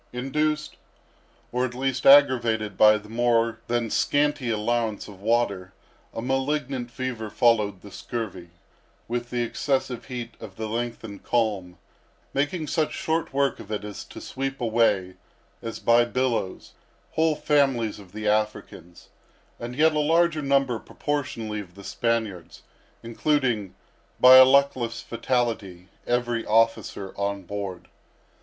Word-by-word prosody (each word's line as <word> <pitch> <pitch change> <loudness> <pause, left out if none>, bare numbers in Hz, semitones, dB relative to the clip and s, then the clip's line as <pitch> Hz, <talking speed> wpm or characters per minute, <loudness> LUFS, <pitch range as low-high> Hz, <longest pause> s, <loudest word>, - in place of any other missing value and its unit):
Induced, 150 +4 -1 0.7
or 125 +1 0
at 125 -1 -3
least 130 0 -1
aggravated, 120 -7 +5
by 105 +1 +6
the 105 0 -12
more 115 0 +1
than 120 -1 -1
scanty 145 -3 +1
allowance 110 0 -1
of 100 -2 -13
water, 100 -4 0 0.4
a 115 - -6
malignant 135 -1 -1
fever 120 -3 -4
followed 105 -5 +2
the 100 - -12
scurvy; 95 -6 -6 0.6
with 120 0 -3
the 120 -1 -1
excessive 130 0 -2
heat 125 -3 -6
of 95 -3 -10
the 110 - -4
lengthened 115 -2 -5
calm, 100 -7 -1 0.6
making 150 +4 -1
such 155 0 -1
short 160 +1 -1
work 140 -1 0
of - - -10
it 105 -1 -3
as 105 -1 -7
to - - -11
sweep 135 0 -4
away, 110 -6 +1 0.4
as 115 -1 -5
by 120 0 +4
billows, 120 -5 -2 0.4
whole 160 -1 +2
families 135 -8 +1
of 95 -3 -14
the 105 +1 -5
Africans, 105 -5 -2 0.5
and 120 +1 -6
a - - -12
yet 160 +1 +4
larger 160 +1 +2
number, 135 -4 +1
proportionably, 115 -8 -4
of 90 -4 -10
the 100 - -12
Spaniards, 110 -6 -3 0.4
including, 115 -4 0 0.4
by 130 +1 +9
a 130 - +10
luckless 130 -4 +2
fatality, 115 -7 -2 0.2
every 120 -1 0
remaining 105 - -7
officer 115 -3 +1
on 100 -1 -2
board. 100 -2 -6
120 Hz, 135 wpm, -25 LUFS, 105-135 Hz, 0.7 s, a